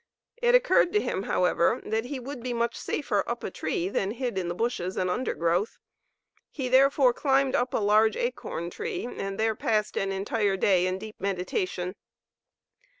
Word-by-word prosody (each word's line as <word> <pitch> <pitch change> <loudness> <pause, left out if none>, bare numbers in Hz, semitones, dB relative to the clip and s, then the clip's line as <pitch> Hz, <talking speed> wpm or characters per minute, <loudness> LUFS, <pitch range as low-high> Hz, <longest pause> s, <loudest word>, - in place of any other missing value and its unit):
It 485 0 +4
occurred - - +4
to 420 - +4
him, 190 - -2
however, 180 -3 +2
that 220 +2 -1
he 270 +1 -4
would 255 0 -7
be 250 0 -3
much 235 0 -1
safer - - -1
up - - -3
a - - -4
tree 365 -4 -2
than 195 - -1
hid 240 0 -3
in 185 -2 -2
the 175 - -3
bushes 190 -5 -2
and 185 -1 0
undergrowth. 180 -3 0 0.7
He 265 -4 -4
therefore 265 0 +5
climbed 270 0 +2
up 245 +1 +1
a - - +3
large 215 +1 +3
acorn 175 -8 -3
tree 430 -4 -4
and 195 -4 -5
there 220 0 +2
passed 215 -1 0
an 195 0 0
entire 200 +1 0
day 185 -2 +3
in 185 0 -1
deep 215 +2 -9
meditation. 185 -1 -2
220 Hz, 175 wpm, -27 LUFS, 190-260 Hz, 0.7 s, therefore